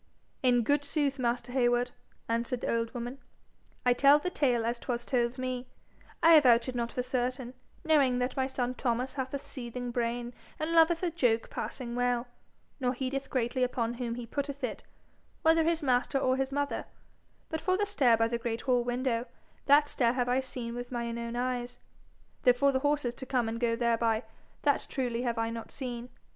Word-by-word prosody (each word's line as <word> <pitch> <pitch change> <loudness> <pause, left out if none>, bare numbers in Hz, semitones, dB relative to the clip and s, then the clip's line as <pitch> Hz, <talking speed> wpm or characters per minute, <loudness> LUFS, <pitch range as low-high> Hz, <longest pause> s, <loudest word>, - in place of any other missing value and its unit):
'In 245 -2 +4
good 290 +5 +2
sooth, 285 -2 -1
master 245 0 -1
Heywood,' 245 -1 +2 0.4
answered 235 +2 -1
the - - 0
old 230 0 -1
woman, 245 +3 -5 0.7
'I 245 - +5
tell 280 +3 +6
the 360 +5 -3
tale 245 -8 +1
as 235 +1 -1
'twas 240 -1 -3
told 240 -1 0
to - - -11
me. 255 -1 -3 0.6
I 330 +1 +8
avouch 250 -7 +6
it 255 - -3
not 235 -1 -2
for 250 - -2
certain, 250 0 -2 0.3
knowing 280 -6 +4
that 250 +1 -1
my 265 -1 +1
son 250 -2 -2
Thomas 250 0 -1
hath 265 -2 -3
a 280 - -1
seething 250 -3 -6
brain 240 0 -2 0.2
and 310 +1 -2
loveth 330 +1 +4
a 350 - +1
joke 245 -8 +1
passing 245 -3 -4
well, 245 0 +1 0.5
nor 250 -1 +1
heedeth 270 +1 -3
greatly 255 0 -1
upon 235 -2 0
whom 240 -1 -3
he 245 -1 -6
putteth 280 +3 -4
it, 235 -4 -3 0.6
whether 325 0 +5
his 330 -1 +1
master 255 0 +2
or 260 -1 +2
his 265 0 -1
mother; 285 +1 -2 0.6
but 320 - -3
for 370 +2 +1
the 410 - +1
stair 270 - +3
by 225 0 +3
the 235 0 -2
great 230 -1 -3
hall 250 -2 +2
window, 245 -1 -1 0.4
that 290 +1 +6
stair 240 -4 +1
have 250 -1 0
I 250 +1 +2
seen 250 -3 -4
with 245 +1 -6
mine 235 -1 -3
own 235 0 -4
eyes, 245 0 -2 0.6
though 250 - +6
for 275 +3 +3
the 260 - +1
horses 290 -3 0
to 260 +1 -9
come 250 -3 +1
and 225 +1 -3
go 230 -1 +1
thereby, 230 -1 +1 0.4
that 285 -2 +2
truly 245 -3 -1
have 240 -2 -1
I 225 0 0
not 230 -1 -7
seen. 245 -2 -5
250 Hz, 195 wpm, -30 LUFS, 235-275 Hz, 0.7 s, I